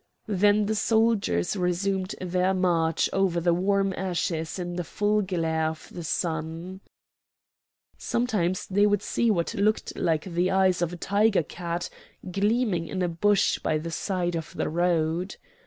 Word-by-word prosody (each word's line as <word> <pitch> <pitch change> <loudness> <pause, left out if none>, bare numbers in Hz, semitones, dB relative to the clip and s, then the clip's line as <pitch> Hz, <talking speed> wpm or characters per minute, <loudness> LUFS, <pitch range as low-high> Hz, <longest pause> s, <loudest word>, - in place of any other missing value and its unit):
Then 205 +1 +3
the 215 - 0
soldiers 220 - +1
resumed 185 +1 -1
their 185 +1 0
march 165 -3 +2
over 190 -3 +1
the 170 0 +2
warm 195 +2 +1
ashes 170 -3 -2
in 175 -1 -4
the 175 - -2
full 210 +5 0
glare 165 -4 0
of 160 0 -6
the 175 - -6
sun. 165 +3 -3 1.2
Sometimes 205 -7 0
they 205 +2 +3
would 205 -1 +1
see 235 - +1
what 170 -6 0
looked 210 +2 0
like 160 -3 0
the 180 0 0
eyes 190 -2 +2
of 175 -1 0
a 175 - -7
tiger 200 0 +2
cat 170 +2 -4 0.4
gleaming 205 -3 +1
in 185 -1 -2
a - - +2
bush 195 +4 +2
by 155 - 0
the 165 +2 -5
side 175 0 -2
of 160 -1 -5
the - - -1
road. 170 +1 0
180 Hz, 155 wpm, -26 LUFS, 170-200 Hz, 1.2 s, Then